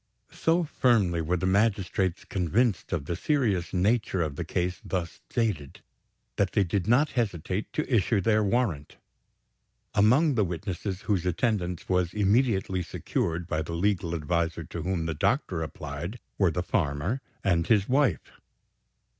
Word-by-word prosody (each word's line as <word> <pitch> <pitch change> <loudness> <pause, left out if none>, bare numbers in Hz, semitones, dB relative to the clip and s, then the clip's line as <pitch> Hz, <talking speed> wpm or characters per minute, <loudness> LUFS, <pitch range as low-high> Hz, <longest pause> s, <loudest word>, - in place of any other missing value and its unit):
So 170 +2 +1
firmly 110 - +2
were 85 +3 0
the 95 - -2
magistrates 95 -2 +1
convinced 100 +5 0
of 80 -6 -2
the 85 - -2
serious 105 - 0
nature 95 -1 +1
of 75 -3 -4
the - - -3
case 90 +1 -2
thus 85 -3 -4
stated, 105 - -2 0.5
that 100 -2 +1
they 105 - +4
did 95 0 -1
not 135 +6 +4
hesitate 100 - -2
to 155 - -1
issue 105 +1 +2
their 105 +2 +2
warrant. 100 - -1 1.0
Among 130 +10 +4
the 110 -4 +2
witnesses 95 +1 -4
whose 100 -5 0
attendance 90 -2 -1
was 90 -1 0
immediately 100 -3 +2
secured, 85 0 -2
by 80 -2 -1
the 80 +2 -5
legal 85 -1 0
adviser 85 +1 -1
to 85 +2 -6
whom 90 -1 -1
the 80 - -1
doctor 90 - 0
applied, 80 +6 -5 0.2
were 95 -3 +4
the 90 +2 -2
farmer 90 - -1 0.2
and 85 -4 +2
his 105 -4 +3
wife. 135 +1 +1
95 Hz, 145 wpm, -27 LUFS, 85-110 Hz, 1.0 s, they